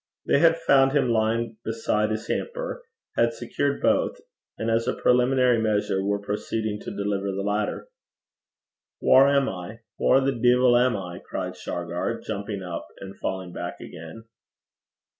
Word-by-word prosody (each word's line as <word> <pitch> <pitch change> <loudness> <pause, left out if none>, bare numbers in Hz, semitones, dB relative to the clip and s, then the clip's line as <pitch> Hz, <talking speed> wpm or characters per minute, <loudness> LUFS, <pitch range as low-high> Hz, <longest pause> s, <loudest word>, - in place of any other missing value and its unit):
They - - +3
had 165 +1 +5
found 135 -4 +4
him 140 -4 +2
lying 115 0 0
beside 110 -1 0
his 110 +1 -3
hamper, - - -3 0.3
had - - +2
secured - - -2
both, - - +2 0.4
and 115 0 -1
as 115 +1 +1
a - - 0
preliminary 125 -1 +3
measure 105 -3 0
were 100 +1 +1
proceeding 105 +1 -3
to - - -7
deliver 100 -1 -1
the 100 +1 -3
latter. 105 - -2 1.1
'Whaur 135 +1 +6
am 140 -1 +3
I? 95 +5 -6 0.2
whaur 135 - +5
the 135 +1 +1
deevil 125 0 +4
am 125 -2 +3
I?' 90 -2 -7
cried - - -5
Shargar, - - -3
jumping 100 -2 -5
up 85 -2 -6
and 95 0 -9
falling 95 -2 -4
back 85 0 -5
again. 85 +6 -10
110 Hz, 150 wpm, -25 LUFS, 100-125 Hz, 1.1 s, Whaur